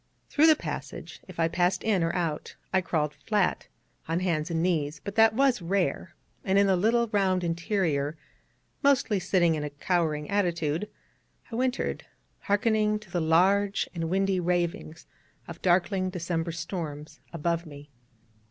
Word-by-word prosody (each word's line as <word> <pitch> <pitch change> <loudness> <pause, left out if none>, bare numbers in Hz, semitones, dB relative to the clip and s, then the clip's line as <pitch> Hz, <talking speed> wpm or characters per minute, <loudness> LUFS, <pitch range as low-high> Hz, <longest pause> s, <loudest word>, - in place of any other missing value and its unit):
Through 305 +2 +4
the 315 - +7
passage, - - -7
if - - -11
I 165 - +3
passed 175 +2 0
in 205 -5 +2
or 165 0 +1
out, 165 -4 -3 0.2
I 190 - +4
crawled 155 -4 -1
flat, 210 -4 -1 0.4
on 165 +2 -1
hands 165 -3 0
and 165 -1 0
knees: 155 -4 0
but 200 - -5
that 225 0 +5
was 265 -4 +3
rare: 180 -1 -1 0.3
and 190 0 +2
in 200 - +5
the 190 -1 +3
little 230 +5 +2
round 190 -4 +1
interior, 165 -4 -1 0.6
mostly 270 -8 +3
sitting 180 -2 +2
in 150 -2 -2
a 150 - -3
cowering 150 0 -1
attitude, 175 -2 0 0.6
I - - -4
wintered, 255 +1 -1 0.4
harkening 210 +1 +1
to 210 -4 -15
the 175 - 0
large 195 +5 +3
and 165 -2 -3
windy 195 +1 +1
ravings 175 -1 -2 0.4
of 170 -1 -9
darkling 185 +1 +2
December 170 -2 -2
storms 160 -3 -6
above 170 +1 -2
me. 145 -1 -12
180 Hz, 150 wpm, -27 LUFS, 165-200 Hz, 0.6 s, the